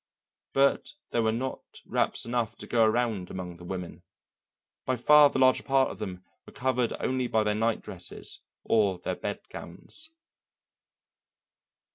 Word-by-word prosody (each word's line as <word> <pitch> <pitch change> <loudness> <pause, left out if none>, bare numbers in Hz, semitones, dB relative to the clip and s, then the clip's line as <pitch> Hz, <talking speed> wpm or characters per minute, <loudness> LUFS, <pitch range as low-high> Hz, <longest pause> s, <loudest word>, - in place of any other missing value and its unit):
But 140 0 +2 0.2
there 120 - +2
were 110 -1 +2
not 130 +4 -5
wraps - - 0
enough 120 -2 -1
to - - -8
go 115 -2 +3
around 110 -4 0
among 90 -2 -6
the 90 - -13
women, 90 0 -6 0.8
by 130 - 0
far 150 +4 +7
the - - -3
larger 130 0 +5
part 135 -1 +2
of - - -10
them 90 -1 -6 0.2
were - - -13
covered 125 -2 0
only 130 -1 0
by 110 -2 +2
their 105 0 +1
night 110 +1 +1
dresses - - -5 0.2
or 100 -4 +2
their 90 - -3
bed - - -4
gowns. 305 - -7
115 Hz, 150 wpm, -28 LUFS, 100-130 Hz, 0.8 s, far